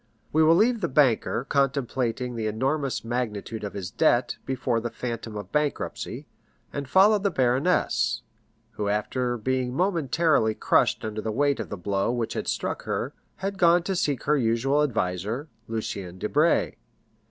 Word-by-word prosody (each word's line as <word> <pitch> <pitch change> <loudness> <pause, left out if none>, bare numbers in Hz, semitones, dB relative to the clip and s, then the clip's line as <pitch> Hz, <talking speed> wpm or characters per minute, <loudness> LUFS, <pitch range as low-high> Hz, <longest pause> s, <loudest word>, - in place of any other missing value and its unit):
We 160 - +4
will 160 +1 +6
leave 230 +4 +3
the - - +1
banker 130 -2 +2
contemplating 125 -3 0
the 110 -2 -2
enormous 135 +5 -1
magnitude 115 -2 -3
of 105 - -4
his 95 -3 -5
debt 120 +1 +2
before 130 -3 0
the 120 +1 -3
phantom 115 -2 -5
of 100 -2 -7
bankruptcy, 150 -1 -2 0.5
and 140 -2 -4
follow 205 +7 +6
the 200 0 +1
baroness, 135 +3 +1 0.5
who 105 -2 -3
after 120 +4 -1
being 125 +2 -1
momentarily 160 - +2
crushed - - +2
under 110 0 -3
the 110 - -2
weight 140 +4 +1
of - - -4
the 105 - -5
blow 100 +4 0
which 120 -2 -2
had - - -4
struck - - -2
her, - - -2 0.2
had 195 0 -4
gone 170 0 +5
to 190 +1 -2
seek 145 -7 0
her 150 +1 +2
usual 125 +5 +2
adviser, 110 - -1 0.2
Lucien 100 -5 -4
Debray. 150 - +1
125 Hz, 155 wpm, -26 LUFS, 110-150 Hz, 0.5 s, will